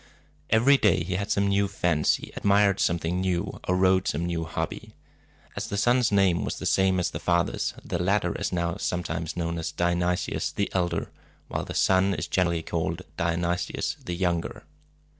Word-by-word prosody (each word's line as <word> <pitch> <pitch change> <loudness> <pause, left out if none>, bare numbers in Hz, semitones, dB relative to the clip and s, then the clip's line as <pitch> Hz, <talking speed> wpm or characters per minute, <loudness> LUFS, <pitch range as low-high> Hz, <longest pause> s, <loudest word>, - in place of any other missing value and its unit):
Every 125 +6 +5
day 100 -8 +3
he 90 +2 -3
had 100 +2 -2
some 100 - +2
new 100 0 +2
fancy, 85 -6 0
admired 100 -1 +3
something 85 +1 0
new, 95 +1 -2
or 90 - +2
rode 95 0 +3
some 85 +4 -1
new 85 -1 -2
hobby. 80 - -5 0.6
As - - -4
the 100 - -3
son's 120 +2 +3
name 95 -4 +3
was - - -3
the - - -6
same 95 -1 +3
as 90 - 0
the - - -5
father's, 85 -1 0
the 85 - -2
latter 100 +3 +1
is - - -2
now 85 -1 -1
sometimes 85 -2 -3
known 85 -1 -2
as 80 - -3
Dionysius 85 0 0
the 100 - -1
Elder, 85 -3 -1 0.4
while - - -3
the - - -7
son 95 +1 +3
is - - -3
generally 85 -3 0
called 85 +2 -2
Dionysius 85 +1 -1
the 90 - -4
Younger. 85 -2 -2
90 Hz, 175 wpm, -26 LUFS, 85-95 Hz, 0.6 s, Every